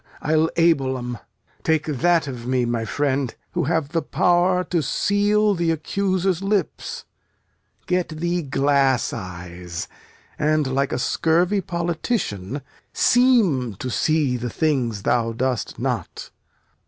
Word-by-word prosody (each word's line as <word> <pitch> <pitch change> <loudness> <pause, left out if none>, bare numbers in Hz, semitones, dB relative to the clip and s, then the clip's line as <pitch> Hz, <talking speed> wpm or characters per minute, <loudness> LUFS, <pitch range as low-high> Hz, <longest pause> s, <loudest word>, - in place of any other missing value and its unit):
I'll 155 +1 +2
able 140 -6 +3
'em. 125 -2 -5 0.4
Take 160 -1 +1
that 160 +3 +2
of 125 -3 -6
me, 125 -1 +1
my 120 -1 -1
friend, 135 +1 -1 0.2
who - - -1
have 160 -2 0
the 165 +1 0
power 180 +4 +2
To 175 -2 0
seal 205 +8 +2
th' 170 -1 0
accuser's 185 +2 0
lips. 200 0 -2 0.8
Get 180 -1 0
thee 170 +2 -1
glass 140 -2 +2
eyes 90 -3 -6 0.5
And, 155 0 +2
like 135 +1 0
a - - -1
scurvy 170 +9 +1
politician, 165 - -2 0.3
seem 205 - +3
To 125 +6 -5
see 150 -2 +1
the 120 0 -4
things 125 -9 0
thou 115 -2 +1
dost 125 0 -2
not. - - -4
150 Hz, 125 wpm, -22 LUFS, 125-175 Hz, 0.8 s, able